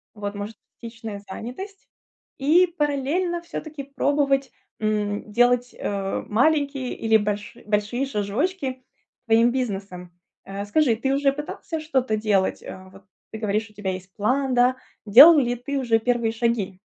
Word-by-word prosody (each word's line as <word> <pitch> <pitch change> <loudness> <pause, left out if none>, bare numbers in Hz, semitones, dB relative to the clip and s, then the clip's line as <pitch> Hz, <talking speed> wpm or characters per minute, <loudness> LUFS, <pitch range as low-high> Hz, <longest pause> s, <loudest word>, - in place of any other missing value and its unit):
Вот, 205 -1 -5
может 205 +2 -6 0.3
частичная 225 -3 -7
занятость. 375 - -8 0.5
И 320 +7 +4
параллельно 300 +5 0
всё-таки 310 -3 -7
пробовать, 275 -1 0 0.3
м, 210 -1 -1
делать, 245 +2 +2
э, 195 -1 -3
маленькие 275 +2 +1
или 220 -1 +2
больши 210 +3 -3
большие 215 +5 0
шажочки 270 - -2 0.5
к - - -57
твоим 230 +1 +4
бизнесам. 195 -8 -4 0.3
Э, 195 +1 -5
скажи, 235 +2 +2
ты 265 +4 0
уже 280 0 +2
пытался 300 +3 -6
что-то 260 -7 0
делать? 210 -3 0
А, 190 0 -10
вот, 195 +1 -17 0.3
ты 220 - -7
говоришь: 215 0 -1
"У - - -22
тебя 200 -2 -3
есть 185 0 -9
план", 260 +5 0
да? 250 +1 +3 0.3
Делал 285 +10 +9
ли 245 -3 +1
ты 275 +4 -4
уже 235 -4 +2
первые 235 -1 0
шаги? 225 -5 -1
235 Hz, 145 wpm, -23 LUFS, 210-275 Hz, 0.5 s, Делал